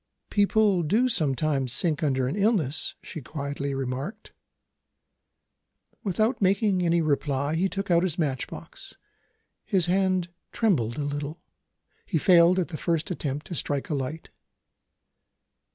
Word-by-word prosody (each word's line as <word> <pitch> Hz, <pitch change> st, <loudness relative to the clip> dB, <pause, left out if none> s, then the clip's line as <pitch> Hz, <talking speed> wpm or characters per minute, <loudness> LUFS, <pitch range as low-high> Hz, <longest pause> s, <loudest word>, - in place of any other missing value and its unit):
"People 205 Hz, -2 st, +3 dB
do 215 Hz, +11 st, +2 dB
sometimes 140 Hz, -, +1 dB
sink 160 Hz, +2 st, +1 dB
under 135 Hz, -4 st, +1 dB
an 135 Hz, -, -2 dB
illness," 195 Hz, -, 0 dB
she 160 Hz, -, -7 dB
quietly 140 Hz, 0 st, -4 dB
remarked. 135 Hz, -, -5 dB, 1.7 s
Without 215 Hz, +5 st, 0 dB
making 195 Hz, 0 st, +2 dB
any 170 Hz, -1 st, +2 dB
reply 145 Hz, -1 st, 0 dB
he 180 Hz, +4 st, +1 dB
took 195 Hz, -1 st, -3 dB
out 170 Hz, 0 st, +5 dB
his 180 Hz, -4 st, -1 dB
matchbox. 140 Hz, -7 st, -4 dB, 0.7 s
His 185 Hz, -4 st, +1 dB
hand 185 Hz, -1 st, +1 dB, 0.2 s
trembled 135 Hz, -, +1 dB
a 150 Hz, -, -2 dB
little; 145 Hz, +3 st, -4 dB, 0.7 s
he 170 Hz, -, 0 dB
failed 175 Hz, +2 st, +5 dB
at 180 Hz, -3 st, 0 dB
the 160 Hz, -, -5 dB
first 165 Hz, +1 st, -1 dB
attempt 145 Hz, -4 st, -3 dB
to -, -, -7 dB
strike 145 Hz, -2 st, -2 dB
a -, -, +1 dB
light. 145 Hz, +3 st, -4 dB
165 Hz, 130 wpm, -26 LUFS, 140-190 Hz, 1.7 s, out